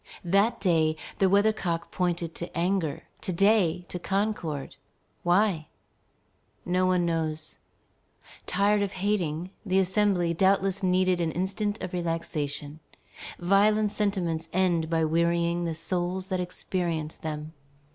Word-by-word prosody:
That 200 +6 +3
day, 160 -4 +2 0.2
the 195 - +4
weather 205 +3 +4
cock 170 -5 -3
pointed 175 -2 -1
to 175 - -7
anger; 175 -3 0 0.2
to - - -2
day 180 -2 +3
to 180 - -5
concord. 175 -8 -2 0.5
Why? 175 -3 +2 1.0
No 185 +1 +2
one 180 -1 +2
knows. 160 -2 -2 0.9
Tired 205 +2 +2
of 200 -2 -1
hating, 185 -3 -1
the 190 -3 +1
Assembly 190 -2 +2
doubtless 195 +2 +2
needed 185 -1 +2
an 165 -1 0
instant 195 +5 -2
of 185 - -5
relaxation. 155 -4 -3 0.6
Violent 205 +3 +3
sentiments 175 -7 -1
end 175 -3 +1
by 165 -1 +2
wearying 170 +1 +1
the 165 -1 -2
souls 180 +3 -2
that 185 -1 0
experience 175 -3 -3
them. 155 0 -5
180 Hz, 125 wpm, -27 LUFS, 165-195 Hz, 1.0 s, the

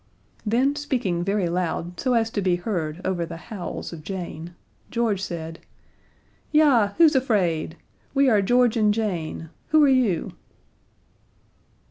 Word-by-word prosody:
Then, 250 +6 +1
speaking 245 -12 -1
very 195 -1 0
loud 175 0 -3
so 255 -2 +1
as 225 -1 +1
to 205 - -1
be 185 -2 +2
heard 175 -4 -3
over 185 -2 -1
the 165 - -6
howls 180 -1 -7
of 165 - -8
Jane, 175 -2 -6 0.3
George 230 -5 0
said: 165 -3 -5 0.9
"Yah 265 -10 +4
who's 320 -3 +6
afraid? 185 -12 0 0.4
We 275 0 +4
are 215 -5 +4
George 245 +3 +3
and 215 -2 +3
Jane 170 -7 -3 0.2
who 310 -1 +5
are - - +6
you?" 250 -9 +1
200 Hz, 135 wpm, -24 LUFS, 175-245 Hz, 0.9 s, who's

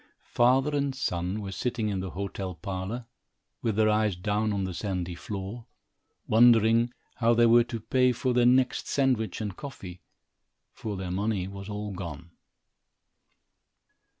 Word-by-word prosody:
Father 130 +4 +3
and 140 -2 0
son 90 -4 -2
were 95 - -5
sitting 115 +1 -2
in 100 -2 -2
the 95 0 -4
hotel 95 0 -5
parlor, 95 +7 -5 0.6
with 110 -3 0
their 110 0 +3
eyes 105 -2 +2
down 105 +4 0
on 100 -1 -1
the 95 -1 -3
sandy 90 -2 -3
floor, 100 +5 -6 0.6
wondering 115 +1 +5 0.3
how 115 0 +3
they 120 0 +5
were 120 +1 +6
to 120 -1 -5
pay 125 +3 +2
for 125 +1 -1
their 120 0 +4
next 130 +1 +2
sandwich 125 -8 0
and 105 -3 -4
coffee, 95 -11 -9 0.7
for 105 -3 -5
their 95 -1 -4
money 100 0 -1
was 100 +1 -8
all 105 0 -4
gone. 85 -3 -7
105 Hz, 150 wpm, -28 LUFS, 95-120 Hz, 0.7 s, were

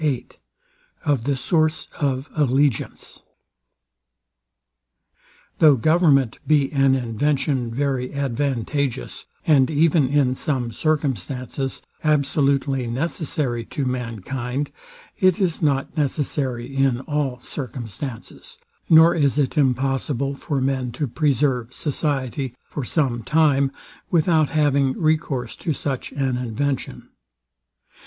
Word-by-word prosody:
VIII 140 -5 -1 0.8
OF 140 -6 +1
THE 140 0 +1
SOURCE 155 +3 +1
OF 135 -1 -1
ALLEGIANCE 140 -4 0 2.4
Though 150 -3 +7
government 140 -3 +3
be 145 -3 +3
an 135 -2 +3
invention 130 +1 0
very 130 0 -1
advantageous, 140 - -2 0.2
and 140 -5 +4
even 155 -2 +3
in 135 -2 +2
some 130 -3 -2
circumstances 135 - -2 0.2
absolutely 140 -3 +1
necessary 130 -2 -2
to 140 - -3
mankind; 125 +2 -3 0.5
it 185 -2 +4
is 180 -5 0
not 140 -2 0
necessary 135 -4 -2
in 135 -2 +2
all 140 -3 -2
circumstances, 125 - -7 0.3
nor 160 0 +7
is 145 -3 +1
it 140 -3 +1
impossible 135 0 0
for 140 0 -3
men 130 -2 -1
to 145 +5 -2
preserve 135 -3 0
society 135 -4 -2
for 145 - -5
some 125 -3 0
time, 140 -1 +3 0.4
without 160 -3 +3
having 140 -4 +2
recourse 150 -7 0
to 165 - -2
such 135 -2 -4
an 135 -3 0
invention. 130 +3 -3
135 Hz, 105 wpm, -22 LUFS, 125-150 Hz, 2.4 s, Though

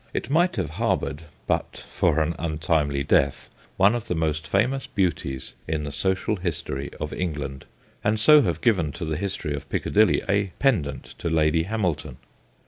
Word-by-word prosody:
It - - -3
might 175 +2 +3
have 95 - -2
harboured, 75 +4 -1 0.2
but - - -2
for 80 - +2
an 80 +2 0
untimely 80 -3 0
death, 70 0 +1 0.3
one 100 +3 +5
of 120 -1 -3
the 100 - -1
most 80 -1 -1
famous 130 +7 +1
beauties 80 -9 -2
in 80 -1 -1
the 75 - -4
social 95 +8 0
history 75 -6 -3
of 75 - -4
England, 70 -6 -4 0.4
and 105 +1 +1
so 150 +7 +7
have 90 -10 -1
given 95 -11 +2
to 85 0 -5
the 80 -1 -2
history 95 -4 -3
of 75 - -6
Piccadilly 110 +1 +2
a 100 -1 +1
pendant 85 - 0
to - - -2
Lady 80 0 +2
Hamilton. 95 - -2
85 Hz, 165 wpm, -25 LUFS, 75-100 Hz, 0.4 s, so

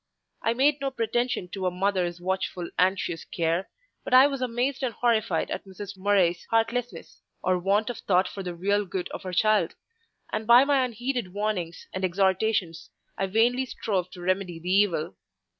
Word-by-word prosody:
I 230 - +1
made 280 +3 +3
no 275 - 0
pretension 240 -4 -1
to 190 0 -3
"a - - +3
mother's 180 -1 -1
watchful, 185 -1 -2
anxious 180 -2 +1
care," 170 +2 -1 0.3
but 255 - +2
I 260 +1 +9
was 275 -2 -1
amazed 250 +3 -1
and 245 -5 -2
horrified 230 -2 +1
at - - -3
Mrs. 195 +1 -9
Murray's 185 -3 +2
heartlessness, 230 +2 -1 0.2
or 185 0 +2
want 200 +5 +1
of 240 - -9
thought 185 -1 +2
for 195 - -7
the 180 -2 -5
real 200 +4 +1
good 180 0 -4
of - - -7
her 185 -2 -6
child; 215 +3 +2 0.6
and 215 - -2
by 240 +3 +8
my 280 -2 +3
unheeded 245 -4 -3
warnings 195 -6 -2
and 185 - -4
exhortations, 190 -1 0 0.3
I 195 - -1
vainly 235 +6 +2
strove 190 -7 -2
to 180 - -10
remedy 185 -1 -1
the 175 +2 -4
evil. 175 - +1
200 Hz, 175 wpm, -26 LUFS, 180-235 Hz, 0.6 s, I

